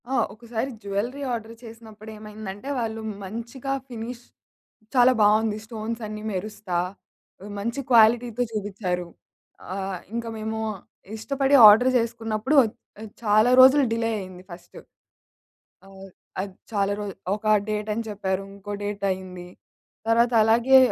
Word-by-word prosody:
ఆ! - - -2 0.2
ఒకసారి 235 +3 -4
jewellery 215 +8 -3
order 230 -1 -5
చేసినప్పుడు 220 -2 -12
ఏమైందంటే 210 +2 -8
వాళ్ళు 225 -1 -3 0.2
మంచిగా 235 +7 -5
ఫినిష్ 240 0 -7 0.7
చాలా 250 0 +6
బావుంది. 210 +1 +3
స్టోన్స్ 225 +1 -5
అన్నీ 215 0 -7
మెరుస్తా, 195 -1 -4 0.7
ఆహ్, 205 - -8
మంచి 235 +6 -3
క్వాలిటీతో 235 +1 +4
జూబిచ్చారు. 195 -4 -3 0.7
ఆహ్, 195 -1 -4 0.2
ఇంకా 235 -1 -3
మేము 220 0 -4 0.6
ఇష్టపడి 275 +4 +1
ఆర్డర్ 235 +5 +7
జేసుకున్నప్పుడు 230 +2 -1
ఒచ్ 220 - -4 0.3
ఆహ్, 220 - -8
చాలా 215 +3 +4
రోజులు 265 +2 +8
డిలే 230 0 0
అయింది 185 -1 -9
ఫస్ట్. 175 0 -12 1.1
ఆహ్, 195 0 -12 0.3
అది 195 -1 -6 0.2
చాలా 200 -2 +1
రోజు 205 -2 -5 0.2
ఒక 215 - -11 0.2
డేట్ 210 0 -2
అని 230 +2 -3
చెప్పారు, 195 -2 -2
ఇంకో 200 +1 -9
డేట్ 205 0 -4
అయింది. 185 -1 -7 0.6
తర్వాత 235 +1 +3
అలాగే 235 +4 +5
220 Hz, 125 wpm, -24 LUFS, 205-235 Hz, 1.1 s, రోజులు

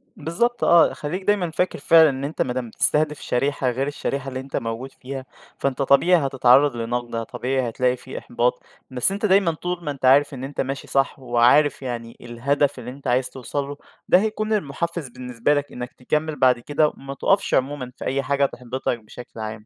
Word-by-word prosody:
بالضبط 235 +11 -1
آه، 170 -1 +5
خلّيك 175 +6 -5
دايمًا 190 -4 +1
فاكر 180 +1 -1
فعلًا 160 +2 +6
إن 135 -1 -4
أنت 145 +3 -3
ما 125 - 0
دام 125 -2 -4
بتستهدف 150 +5 +1
شريحة 135 +1 0
غير 130 +3 -1
الشريحة 140 -1 -3
اللي 130 0 -5
أنت 135 +1 -8
موجود 115 +4 -4
فيها، 135 0 -6 0.3
فأنت 140 0 -1
طبيعي 140 +3 +4
هتتعرض 135 +1 +4
لنقد، 120 0 -3
طبيعي 130 +1 -2
هتلاقي 125 +2 0
في 130 - -9
إحباط، 120 +1 -1 0.3
بس 130 +8 +1
أنت 200 +2 -2
دايمًا 195 -3 +4
طول 175 +2 -4
ما 150 - -2
أنت 135 -2 -5
عارف 140 +3 +5
إن 130 -1 -7
أنت 140 +2 -3
ماشي 135 +1 -4
صح، 135 0 0
وعارف 125 +4 +3
يعني 120 -3 -6
الهدف 135 +4 0
اللي 125 0 -7
أنت 140 +2 -9
عايز 125 +1 +1
توصل 135 +2 -4
له 145 0 -7 0.3
ده 180 - +6
هيكون 215 +1 -1
المُحفز 170 -4 -2
بالنسبة 125 +2 -1
لك 145 -1 -2
إنّك 125 0 -7
تكمل 150 +4 -2
بعد 125 -2 +4
كده، 145 +5 +1
وما 135 -2 -7
تقفش 195 +8 +1
عمومًا 130 -1 0
في - - -7
أي 135 +1 0
حاجة 140 0 +2
تحبطك 125 -2 -3
بشكل 115 +2 -12
عام. 110 0 -6
135 Hz, 190 wpm, -23 LUFS, 125-150 Hz, 0.3 s, فعلًا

